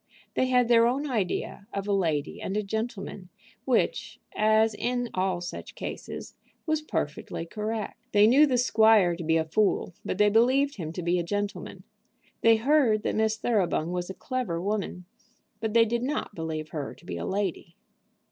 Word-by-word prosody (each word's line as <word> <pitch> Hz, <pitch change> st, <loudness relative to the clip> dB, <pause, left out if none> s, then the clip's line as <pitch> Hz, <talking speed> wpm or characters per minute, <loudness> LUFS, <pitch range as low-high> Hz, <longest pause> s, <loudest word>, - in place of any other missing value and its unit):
They 260 Hz, -, +1 dB
had 250 Hz, -2 st, +3 dB
their 230 Hz, -1 st, +5 dB
own 275 Hz, +5 st, -1 dB
idea 200 Hz, -4 st, -2 dB
of 200 Hz, 0 st, -4 dB
a 205 Hz, -, +1 dB
lady 160 Hz, -6 st, -1 dB
and 195 Hz, -, -3 dB
a 210 Hz, -, 0 dB
gentleman, 200 Hz, -3 st, -5 dB, 0.4 s
which, 265 Hz, -, 0 dB, 0.2 s
as 220 Hz, +1 st, +3 dB
in 245 Hz, +2 st, -2 dB
all 185 Hz, -1 st, 0 dB
such 175 Hz, -, -7 dB
cases, -, -, -7 dB, 0.3 s
was 310 Hz, -1 st, 0 dB
perfectly 165 Hz, -, -4 dB
correct. 215 Hz, +4 st, -4 dB
They 205 Hz, 0 st, +6 dB
knew 275 Hz, +7 st, +6 dB
the 255 Hz, -3 st, +1 dB
squire 220 Hz, -7 st, +4 dB
to 170 Hz, -, -6 dB
be 160 Hz, 0 st, +2 dB
a 160 Hz, -, 0 dB
fool, 190 Hz, +2 st, +1 dB
but -, -, -3 dB
they 210 Hz, 0 st, +4 dB
believed 260 Hz, +5 st, +3 dB
him 160 Hz, -4 st, -4 dB
to 180 Hz, -, -5 dB
be 175 Hz, +1 st, +1 dB
a -, -, -1 dB
gentleman. 205 Hz, +3 st, -4 dB, 0.6 s
They 230 Hz, 0 st, +6 dB
heard 235 Hz, -3 st, +3 dB
that -, -, -1 dB
Miss 220 Hz, 0 st, +1 dB
Thoroughbung 190 Hz, -7 st, 0 dB
was 180 Hz, 0 st, -3 dB
a 190 Hz, -, -6 dB
clever 250 Hz, -10 st, -3 dB
woman, 195 Hz, -2 st, -3 dB, 0.5 s
but 220 Hz, 0 st, -3 dB
they 230 Hz, -1 st, +7 dB
did 235 Hz, +1 st, -1 dB
not 275 Hz, -3 st, -2 dB
believe 160 Hz, -3 st, -4 dB
her 150 Hz, -3 st, -5 dB
to -, -, -20 dB
be -, -, -5 dB
a -, -, -4 dB
lady. 190 Hz, -4 st, -3 dB
210 Hz, 180 wpm, -27 LUFS, 180-235 Hz, 0.6 s, they